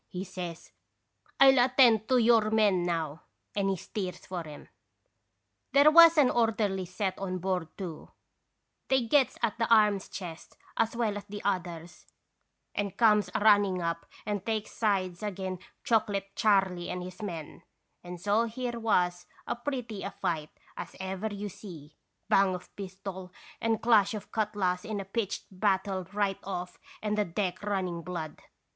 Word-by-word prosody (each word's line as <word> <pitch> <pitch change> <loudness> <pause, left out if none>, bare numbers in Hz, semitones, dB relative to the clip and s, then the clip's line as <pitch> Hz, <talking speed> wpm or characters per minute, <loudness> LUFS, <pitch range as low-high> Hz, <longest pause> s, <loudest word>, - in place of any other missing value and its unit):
he 180 +1 -5
says. 180 -3 -7 0.7
"I 275 - +9
'11 265 -1 +5
attend 230 -5 +5
ioyour 230 -4 +4
men 210 -4 +3
now.' 160 -3 -2 0.3
And 200 -1 +1
he 195 - +1
steers 185 +1 -5
for 175 -3 -5
'em. 150 -1 -11 1.1
"There 285 +2 +7
was 335 0 +9
an 280 -4 +5
orderly 215 -5 +1
set 185 +2 -3
on 185 -1 -3
board, 180 -2 -1
too; 175 -6 -7 0.8
they 265 -2 +2
gets 260 +1 +3
at 235 0 0
the 230 - 0
arms 210 -3 +4
chest, 170 -4 -8 0.2
as 230 0 0
well 220 -3 0
as 205 - -8
the 205 0 -8
others, 175 -3 -3 0.7
and 200 -2 -3
comes 210 -5 +4
a - - +1
running 205 -3 +5
up 170 -1 -3 0.2
and 205 -3 -2
takes 220 -1 -2
sides 190 -5 0
agin 190 -3 -4 0.2
Chocolate 200 -3 0
Charley 190 -4 +2
and 180 0 -4
his 185 +3 -9
men, 170 -7 -6 0.4
and 175 0 -8
so 205 +5 +2
here 240 +1 -4
was 180 -5 +1 0.2
as - - -3
pretty 245 -8 -4
a 200 - -3
fight 155 -6 -3 0.3
as - - -7
ever 190 +2 -3
you 205 0 -4
see, 160 -7 -11 0.3
bang 195 -1 +4
of 180 - -11
pistol 190 -1 -7 0.3
and 225 -1 0
clash 215 -3 +4
of 210 - -8
cutlass 205 -5 0
in 215 -1 -4
a 195 - -5
pitched 200 +1 -3
battle 190 -1 0
right 200 -2 0
off 180 -2 -5 0.2
and 210 -1 0
the 210 - +2
deck 180 +1 -2
running 190 -4 -2
blood. 165 -3 -6
195 Hz, 160 wpm, -29 LUFS, 180-220 Hz, 1.1 s, I